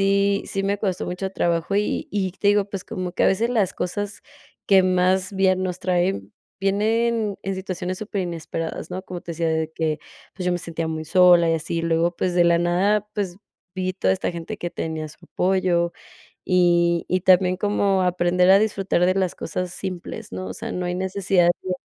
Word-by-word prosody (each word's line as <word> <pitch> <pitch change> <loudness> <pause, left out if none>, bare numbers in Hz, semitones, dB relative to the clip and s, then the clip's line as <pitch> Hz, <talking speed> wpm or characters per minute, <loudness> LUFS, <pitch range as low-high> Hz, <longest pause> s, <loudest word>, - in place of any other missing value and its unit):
sí 200 0 +2
sí 195 - -2
me 200 +1 0
costó 190 -4 -2
mucho 180 +2 -4
trabajo, 175 0 0
y 210 +1 -1
y 190 -3 -1
te 200 +2 0
digo, 205 -1 +4
pues 195 -2 -6
como 180 -1 -5
que - - +1
a - - +5
veces 225 +5 +2
las 215 -7 +1
cosas 205 +3 -4 0.4
que 195 -1 +6
más 185 +1 +2
bien 185 -1 +2
nos 185 -1 -3
traen, 180 - -1 0.3
vienen 215 +2 +1
en 195 +1 -2
situaciones 185 -1 -4
superinesperadas, 170 -6 -4
¿no? 185 +1 -4
Como 180 -2 -7
te 170 - -7
decía 165 0 -1
de 160 0 -1
que, 160 -1 -1 0.4
pues, 185 - -5
yo 180 - +2
me 175 - -1
sentía 165 -1 -4
muy 160 0 -4
sola 175 0 +5
y - - +3
así, 165 +1 -2
luego 165 +1 +1
pues, 180 -1 -1
de 175 - +4
la 170 0 +4
nada, 195 +5 +2
pues 195 -4 -3 0.4
vi 185 -1 -2
toda 190 0 +1
esta 190 - -2
gente 170 -1 -6
que 175 - -4
tenía 160 -1 -4
su 150 - -15
apoyo. 180 -2 +1 0.6
Y 175 -2 +3
y 185 +1 +1
también 185 0 +4
como 200 -1 +1
aprender 180 0 +2
a 195 - +7
disfrutar 195 -4 +1
de 185 - +3
las 190 -2 0
cosas 180 +2 -4
simples, 185 -3 -6
¿no? 95 0 -5
O 95 - -5
sea, - - -6
no 180 - -3
hay 175 0 -2
necesidad 190 -1 +1 0.2
de 185 - -3
185 Hz, 200 wpm, -23 LUFS, 170-195 Hz, 0.6 s, a